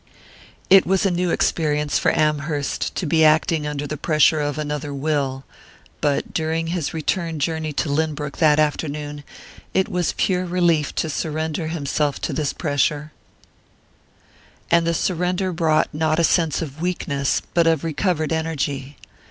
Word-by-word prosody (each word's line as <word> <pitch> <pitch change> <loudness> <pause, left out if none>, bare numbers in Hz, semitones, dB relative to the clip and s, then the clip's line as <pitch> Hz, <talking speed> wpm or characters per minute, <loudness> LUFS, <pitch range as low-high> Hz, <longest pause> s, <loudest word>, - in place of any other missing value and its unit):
It 195 0 +6
was 190 +2 +2
a 195 - +3
new 175 0 0
experience 150 -3 +1
for - - +2
Amherst 150 -1 -1
to 185 - -2
be 160 +1 +3
acting 155 0 +3
under 145 -1 -3
the 150 +1 -4
pressure 155 0 +3
of 145 0 -2
another 150 -1 -3
will; 140 -2 -1 0.6
but 145 -1 0
during 160 0 -1
his 170 -5 -2
return 165 +1 -2
journey 160 +1 -2
to 135 +2 -1
Lynbrook 150 0 -2
that 155 -3 +4
afternoon 150 -1 -2 0.5
it 190 - +3
was 180 -2 -1
pure 185 -1 +1
relief 170 -4 +1
to - - 0
surrender 155 +1 -2
himself 150 -2 -1
to - - -2
this 150 -3 -1
pressure, 150 0 -1 1.6
and 170 0 +4
the 170 - +1
surrender 180 +2 0
brought 160 -2 +1
not 155 +1 +1
a 170 - +3
sense 165 -1 +2
of 150 0 -8
weakness 140 -6 -1
but 170 -1 +3
of 160 -2 +2
recovered 160 0 0
energy. 145 -4 -3
155 Hz, 150 wpm, -22 LUFS, 145-165 Hz, 1.6 s, It